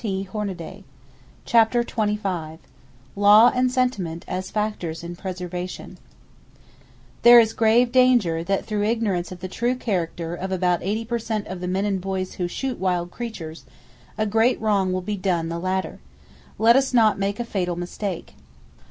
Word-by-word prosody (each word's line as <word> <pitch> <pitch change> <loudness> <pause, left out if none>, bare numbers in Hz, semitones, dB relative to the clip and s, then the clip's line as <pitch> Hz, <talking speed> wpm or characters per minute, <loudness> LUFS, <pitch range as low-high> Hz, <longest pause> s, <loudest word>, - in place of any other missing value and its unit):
[Page 195 -3 -2
244] 195 -6 -5 0.6
CHAPTER 235 +1 +4
XXV 200 -9 -2 0.6
LAW 205 +4 +7
AND 250 0 +1
SENTIMENT 205 -11 -1
AS 185 +1 -4
FACTORS 210 -7 -3
IN 170 +1 -6
PRESERVATION 180 -1 -6 1.2
There 240 0 +9
is 225 -1 +3
grave 230 +2 +3
danger 240 -11 +3
that 195 +3 -1
through 210 -2 -2
ignorance 205 -5 -1
of 180 -1 -9
the 185 - -4
true 240 +6 -1
character 175 -7 -3
of 190 +2 -5
about 180 -1 +1
80 215 +5 -2
per 235 +1 -2
cent 220 -2 -3
of 185 0 -6
the 180 - -3
men 190 +2 0
and 195 -2 -1
boys 190 0 -3
who 175 - +1
shoot 260 +7 -4
wild 180 -2 -1
creatures, 175 -10 -7 0.5
a 215 - +1
great 225 +4 +2
wrong 200 -4 +1
will 185 0 -1
be 205 +2 -4
done 175 -4 -1
the 170 0 -3
latter. 185 -1 -2 0.6
Let 225 +3 +5
us 270 -1 +2
not 220 -4 +4
make 200 +2 -2
a 240 - -2
fatal 180 -5 -2
mistake. 175 - -5
195 Hz, 160 wpm, -23 LUFS, 180-225 Hz, 1.2 s, There